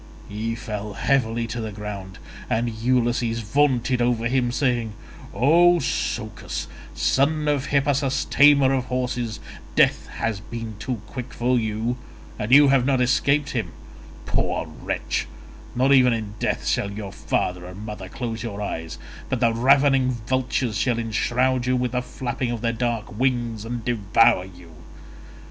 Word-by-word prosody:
He 110 +2 -3
fell 105 -3 -5
heavily 115 -2 +1
to 115 +1 -4
the 110 -1 -4
ground 100 -2 -7 0.3
and 115 +2 +1
Ulysses 120 0 0
vaunted 125 +1 +1
over 120 -1 +1
him 125 -1 +1
saying, 120 -4 0 0.4
"O 170 +7 +5
Socus, - - -3 0.3
son 150 +3 +1
of 145 -2 0
Hippasus 140 -1 +1
tamer 140 -2 +5
of 130 -2 0
horses, 125 -3 -2 0.4
death - - +3
has 110 -3 -3
been 115 +1 -7
too 115 -1 -4
quick 120 +3 -7
for 125 +1 +1
you 110 +2 -2 0.4
and 105 +2 -3
you 145 +1 +8
have 135 -2 +4
not 135 0 +2
escaped 140 +3 +2
him: 110 -9 -3 0.5
poor - - -1
wretch, - - -3 0.5
not 130 +3 +4
even 125 -2 +5
in 110 -3 -4
death - - -1
shall 100 - 0
your 100 -1 -6
father 90 0 -2
and 95 +4 -9
mother 105 -4 -7
close 115 0 -4
your 105 -3 -5
eyes, 80 -5 -4 0.3
but - - -1
the 115 -1 +3
ravening 135 +2 +4
vultures 120 -1 -1
shall 120 +1 +1
enshroud 120 +3 0
you 130 - +2
with 125 -1 0
the 125 0 0
flapping 125 0 -4
of 120 -2 -3
their 115 -1 0
dark 115 -2 -3
wings 120 -4 0
and 120 -1 -5
devour 105 -4 +3
you. 90 -3 -14
120 Hz, 150 wpm, -23 LUFS, 110-130 Hz, 0.5 s, you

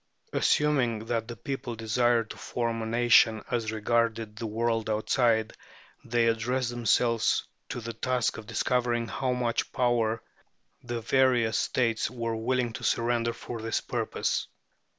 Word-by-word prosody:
Assuming 125 -7 +2
that 115 -1 -2
the 120 - -6
people 125 +1 -5
desired 115 0 +1
to - - -8
form 115 -1 -2
a 110 - -3
nation 115 -1 +4
as 115 -3 -1
regarded 115 0 0
the 115 +1 -4
world 115 0 -1
outside, 110 +1 +1 0.5
they 120 0 +1
addressed 120 +2 0
themselves 115 -1 +2 0.3
to - - -4
the 115 +1 -5
task 125 -1 0
of 110 - -11
discovering 120 -1 0
how 130 +4 -1
much 120 -2 -1
power 120 -3 +1 0.6
the 120 -1 -4
various 120 -2 +3
States 115 -4 0
were 115 -1 -3
willing 120 +1 0
to - - -7
surrender 115 0 +1
for 115 0 -7
this 115 0 -1
purpose. - - -2
115 Hz, 140 wpm, -28 LUFS, 110-120 Hz, 0.6 s, nation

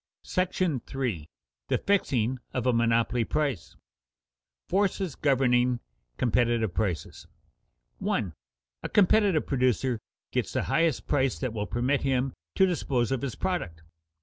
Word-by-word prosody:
§ 175 -8 -1
III. 85 -11 -2 0.4
THE - - +2
FIXING 130 - +1 0.2
OF 125 -2 -1
A 125 - +3
MONOPOLY 115 +1 +2
PRICE 140 - 0
[Sidenote: - - -25 0.8
Forces 190 -3 0
governing 125 -3 +2 0.4
competitive 120 -4 +1
prices] 90 -6 -3 0.7
1. 95 -7 -1 0.5
_A - - -4
competitive 200 -4 +4
producer 130 -2 +1 0.3
gets - - -1
the - - 0
highest 165 -5 +1
price 135 -3 +1
that 130 -4 -3
will 105 -2 -3
permit 125 +5 0
him 135 -1 0 0.2
to 190 - +5
dispose 135 - 0
of 135 -3 0
his 135 -5 -3
product. 85 - -3
130 Hz, 125 wpm, -28 LUFS, 115-150 Hz, 0.8 s, to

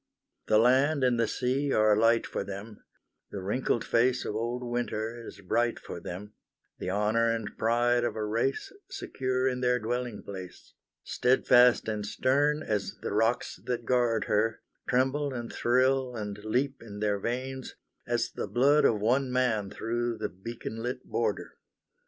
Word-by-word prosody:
The 110 - +4
land 130 +5 +4
and 125 -2 +3
the 115 - +2
sea 135 +4 -1
are 110 0 +4
alight 115 +2 +3
for - - -3
them; 100 +2 -8 0.5
The 100 - -6
wrinkled 110 +5 -1
face 125 +2 +2
of - - -3
old 120 +3 -2
Winter 120 -1 -3
is - - -11
bright 120 +5 0
for - - -8
them; 95 +5 -8 0.5
The - - -3
honour 105 +4 +2
and 115 -2 -3
pride 120 +1 +2
of 120 - -1
a 110 -1 -2
race 115 - -1 0.2
Secure 130 - -2
in 125 -1 -1
their 125 0 +3
dwelling 120 -1 -3
place, 95 -2 -9 0.3
Steadfast 125 -1 +4
and 105 -1 -2
stern 140 +8 +1
as 105 -2 -2
the - - -2
rocks 115 +3 0
that 120 -2 -2
guard 120 -2 +2
her, 110 +2 0 0.3
Tremble 135 +2 +1
and 120 -1 -5
thrill 130 +1 +2
and 105 -2 -4
leap 130 +5 -1
in 105 -3 -9
their 105 -1 0
veins, 130 +4 -4 0.3
As - - 0
the - - -4
blood 140 +5 +4
of 110 - +3
one 125 +5 +1
man 120 -6 +1
through 120 +2 -2
the - - -3
beacon 115 +3 -7
lit 125 +2 -4
border! - - -2
120 Hz, 160 wpm, -29 LUFS, 110-130 Hz, 0.5 s, The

